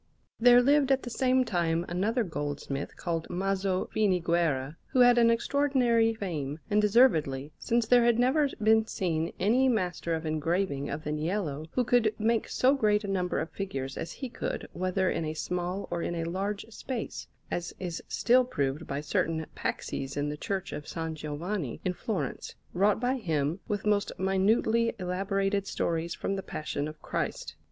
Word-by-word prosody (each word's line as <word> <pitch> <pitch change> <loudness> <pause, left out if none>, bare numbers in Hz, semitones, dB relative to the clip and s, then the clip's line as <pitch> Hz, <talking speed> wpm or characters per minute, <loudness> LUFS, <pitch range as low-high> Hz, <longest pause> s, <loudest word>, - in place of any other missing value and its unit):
There 245 +1 +7
lived 280 0 +4
at 265 0 +2
the 245 - -6
same 255 +1 +2
time 170 -4 0
another 210 +8 0
goldsmith 145 -5 -4
called 165 -2 -3
Maso 190 0 0
Finiguerra, 170 -8 +1
who 255 - +2
had 245 -1 +7
an 230 -1 +5
extraordinary 240 -2 +2
fame, 155 -9 -3
and 210 +1 +4
deservedly, 160 - +3
since 235 0 +1
there 245 +1 +5
had 235 -1 +4
never 270 +4 +3
been 220 0 +4
seen 165 -5 -1
any 250 +7 +3
master 180 -6 0
of 160 0 -5
engraving 155 -1 -1
and 150 +2 -4
of 150 - -1
niello 155 -2 -2
who 250 - +2
could 225 -3 +2
make 225 +1 +1
so 260 +2 +3
great 215 -5 +2
a - - -4
number 185 -2 0
of 160 0 -4
figures 135 -10 -4
as 165 - -5
he 265 - -5
could, 240 - -4
whether 185 +2 0
in 165 - 0
a 155 0 -3
small 180 +4 -3
or 175 -1 -1
in 175 - -2
a 165 - -2
large 195 +4 -3
space; 245 +1 -5 0.2
as 175 0 -2
is 180 -2 -4
still 245 +4 +4
proved 145 - -2
by 140 +1 -3
certain 160 +2 -1
paxes 135 +1 -3
in 145 0 0
the 150 - -3
Church 190 +3 -3
of 150 - -6
S. - - -8 0.2
Giovanni 155 - -4
in 180 - +1
Florence, 205 +2 -4 0.2
wrought 200 +3 +3
by 250 +3 +1
him 160 - -1
with 205 -2 -2
most 205 -1 +2
minutely 220 +4 +2
elaborated 195 +2 -1
stories 170 -2 -1
from 195 - -2
the - - -2
Passion 150 -4 -4
of 155 0 -9
Christ. - - -3
190 Hz, 175 wpm, -29 LUFS, 160-225 Hz, 0.2 s, There